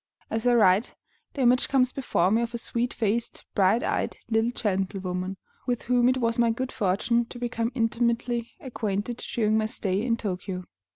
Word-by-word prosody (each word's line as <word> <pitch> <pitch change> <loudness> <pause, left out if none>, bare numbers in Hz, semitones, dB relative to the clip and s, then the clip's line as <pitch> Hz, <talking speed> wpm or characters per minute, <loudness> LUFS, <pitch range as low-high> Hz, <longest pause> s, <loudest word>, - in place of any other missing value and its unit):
As 225 +2 0
I 245 - +5
write, 205 0 +4 0.4
the 280 - -2
image 250 +1 +4
comes 255 -2 +3
before 190 -10 +1
me 225 +2 +3
of 235 0 -3
a - - -1
sweet 235 +1 -2
faced, 225 +1 -2
bright 200 +3 +3
eyed - - -1
little 225 +1 +3
gentlewoman 190 -4 -2 0.3
with 245 -2 -1
whom 245 0 +3
it 255 - +2
was 230 -1 0
my 235 -1 +4
good 255 +3 -2
fortune 235 +3 +1
to 245 - -10
become 235 -1 -2
intimately 235 0 0
acquainted 220 -2 -3
during 220 -3 0
my 215 - 0
stay 195 -2 -1
in 230 0 +1
Tōkyō. 185 -3 -4
230 Hz, 175 wpm, -26 LUFS, 205-240 Hz, 0.4 s, I